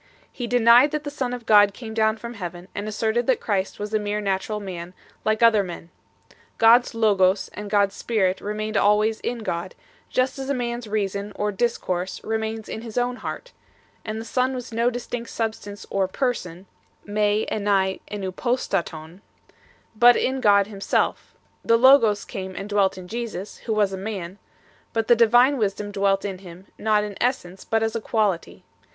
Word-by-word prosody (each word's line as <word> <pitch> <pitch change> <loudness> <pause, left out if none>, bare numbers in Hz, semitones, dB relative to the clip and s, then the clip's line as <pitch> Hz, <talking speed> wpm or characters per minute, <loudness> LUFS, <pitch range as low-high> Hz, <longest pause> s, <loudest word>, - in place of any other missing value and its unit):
He 245 - -5
denied 245 +3 +6
that 300 0 -3
the 290 - -5
Son 265 -4 -3
of 245 -2 -6
God 205 -2 +5
came 225 -3 -8
down 220 0 +2
from 235 +2 -7
Heaven, 180 -4 -7
and 205 +1 -4
asserted 220 +2 -1
that 260 -3 +3
Christ 195 -3 -2
was 210 +1 -6
a 215 - +2
mere 210 0 -2
natural 200 +1 -2
man 180 -3 -7 0.3
like 215 +1 +1
other 225 -3 +6
men 175 -2 -8 0.4
1. - - -25 0.2
God 230 +2 +7
s 245 - -10
Logos 200 -4 +2
and 205 0 -7
God 200 -1 +3
s 200 - -15
Spirit 190 -5 0
remained 215 +1 -4
always 210 +2 +3
in 235 -2 -4
God, 170 -2 -4 0.3
just 255 +1 0
as 270 0 -5
a 280 - +1
man 240 -1 -2
s 235 - -10
Reason 205 -1 -2
or 210 0 -1
Discourse 190 -4 -2
remains 220 0 -3
in 220 - -6
his 230 -1 -8
own 245 0 0
heart; - - -7 0.5
the 220 +1 -5
Son 255 +2 0
was 250 -1 -7
no 235 +2 +2
distinct 245 -1 -5
substance 220 -2 -4
or 195 -1 +1
person 190 -6 -3 0.4
(/j,rj 210 +1 +1
elvai 195 -2 +1
evvTroo 195 -3 -4
rarov), 180 -8 -2 0.8
but 240 +2 +7
in 260 0 0
God 200 -3 +5
Himself; 200 -1 -2 0.3
the 230 - +4
Logos 230 -5 +5
came 190 -1 -6
and 195 - -5
dwelt 200 -2 +1
in 185 -1 -9
Jesus, 220 -3 -5
who 220 - +1
was 205 -2 +1
a - - -3
man; 190 -2 -6 0.5
but 225 -1 -1
the 240 - +6
divine 240 +4 +5
Wisdom 205 -1 -2
dwelt 195 -1 +1
in 190 -2 -4
Him 180 0 -12
not 210 -1 +2
in 205 -1 -6
essence, 195 -8 -1
but 225 0 0
as 225 0 -1
a 230 - -2
quality. 210 -6 -1
215 Hz, 185 wpm, -23 LUFS, 195-235 Hz, 0.8 s, God